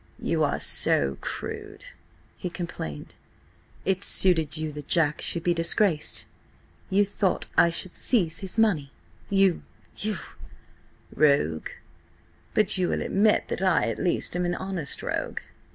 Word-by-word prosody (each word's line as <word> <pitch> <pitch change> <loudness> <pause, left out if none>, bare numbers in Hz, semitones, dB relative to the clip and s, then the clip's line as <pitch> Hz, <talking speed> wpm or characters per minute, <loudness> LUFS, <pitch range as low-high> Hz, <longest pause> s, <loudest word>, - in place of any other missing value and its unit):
"You - - 0
are - - 0
so 70 -1 +4
crude," - - -6 0.5
he 180 - -5
complained. 80 - -6 0.7
"It 190 +1 0
suited 160 -7 +2
you 155 0 -3
that 150 -1 -9
Jack 155 -3 +2
should 170 - -3
be 175 - +2
disgraced? 165 -1 +1 0.6
You 200 +1 +3
thought 195 -1 -1
I 170 - +5
should 175 +2 -2
seize 180 -10 +1
his 190 +1 -3
money. 175 -11 +2 0.4
You–you—" 195 +2 0 1.0
"Rogue? 140 - +2 0.9
But 210 -2 +2
you 180 - +1
will - - -1
admit 210 +2 +2
that - - -3
I 185 - +3
at 115 - -4
least 180 - +1
am 180 - 0
an 175 0 -1
honest 185 -7 -3
rogue. - - -3
175 Hz, 135 wpm, -26 LUFS, 155-195 Hz, 1.0 s, I